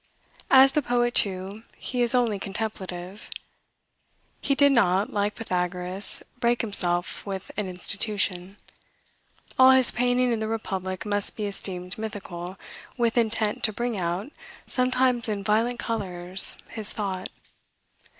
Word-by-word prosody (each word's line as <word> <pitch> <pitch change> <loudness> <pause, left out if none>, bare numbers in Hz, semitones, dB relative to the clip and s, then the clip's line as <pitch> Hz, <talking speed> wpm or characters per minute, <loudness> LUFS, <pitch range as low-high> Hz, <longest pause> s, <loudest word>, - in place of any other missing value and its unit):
As 265 0 +7
the 300 - +1
poet, 240 -1 0
too, 195 +2 +1 0.2
he 250 -1 -3
is 240 +1 +2
only 230 -5 +1
contemplative. 195 -2 -6 1.1
He 275 - 0
did 285 0 +5
not, 200 -5 +2
like 205 0 -1
Pythagoras, 180 -2 +1 0.2
break 240 -1 +1
himself 175 -5 -1
with 195 -2 -6
an 210 -1 -2
institution. 195 0 -4 1.0
All 260 0 +8
his 260 -2 +7
painting 245 +1 +1
in 230 - -1
the 220 - -3
Republic 190 -4 -4
must 205 -1 +3
be 210 - -3
esteemed 185 -2 -4
mythical, 195 -4 -7 0.4
with 235 -2 +1
intent 220 -2 0
to 215 - 0
bring 235 -1 -3
out, 180 +9 -3 0.3
sometimes 255 -2 +1
in 205 -2 -3
violent 225 +4 +1
colors, 185 -5 +2
his 220 -2 0
thought. 190 -3 -4
210 Hz, 130 wpm, -25 LUFS, 185-240 Hz, 1.1 s, All